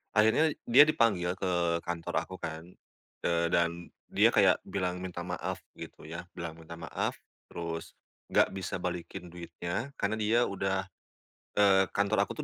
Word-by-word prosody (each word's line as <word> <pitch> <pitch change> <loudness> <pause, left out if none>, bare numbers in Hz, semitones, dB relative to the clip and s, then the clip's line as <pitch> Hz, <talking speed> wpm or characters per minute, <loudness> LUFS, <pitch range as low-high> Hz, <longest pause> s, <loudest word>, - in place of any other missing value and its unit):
Akhirnya 110 +9 +5 0.2
dia 130 +5 +9
dipanggil 105 -12 +2
ke 85 -3 +1
kantor 85 -1 -3
aku 95 - -8
kan, 80 -1 -6 0.6
eee, 85 0 +2
dan 85 0 0 0.2
dia - - +5
kayak - - +5
bilang 90 -2 -2
minta 90 -1 -5
maaf 90 0 -4 0.2
gitu - - -9
ya, 85 +3 -7
bilang 85 -1 -6
minta 80 +1 -9
maaf, 85 0 -3 0.3
terus 85 -1 -6 0.3
nggak - - +3
bisa 95 -1 -4
balikin 90 0 -5
duitnya 90 +9 -5
karena 105 +2 0
dia 115 +3 +3
udah 95 -2 -1 0.7
eee, 95 -2 +5
kantor 100 +1 +2
aku - - -4
90 Hz, 145 wpm, -30 LUFS, 85-100 Hz, 0.7 s, dia